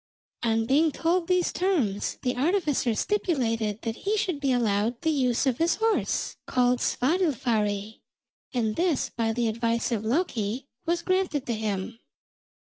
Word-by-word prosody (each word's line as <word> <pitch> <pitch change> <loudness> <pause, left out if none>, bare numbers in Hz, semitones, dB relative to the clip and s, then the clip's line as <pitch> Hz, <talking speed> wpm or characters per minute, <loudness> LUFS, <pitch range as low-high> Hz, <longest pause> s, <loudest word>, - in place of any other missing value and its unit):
On 225 -1 +1
being 300 +6 +3
told 335 +4 0
these 365 -1 +2
terms, 285 - 0
the 250 0 0
artificer 290 - +1
stipulated 230 - 0
that 225 -1 -3
he 420 +2 -1
should 365 -7 -1
be 275 -2 +1
allowed 230 -1 +1
the 320 - +2
use 255 -4 +1
of 255 -3 +1
his 335 +1 +3
horse, 445 0 0
called 250 0 +2
Svadilfari, 230 - 0 0.5
and 220 -4 0
this, 340 -5 0
by 225 -1 0
the 235 +1 0
advice 230 +2 0
of 220 -3 -1
Loki, 240 - -1 0.2
was 340 0 0
granted 370 -7 0
to 240 - -1
him. 215 0 -3
250 Hz, 145 wpm, -26 LUFS, 225-330 Hz, 0.5 s, being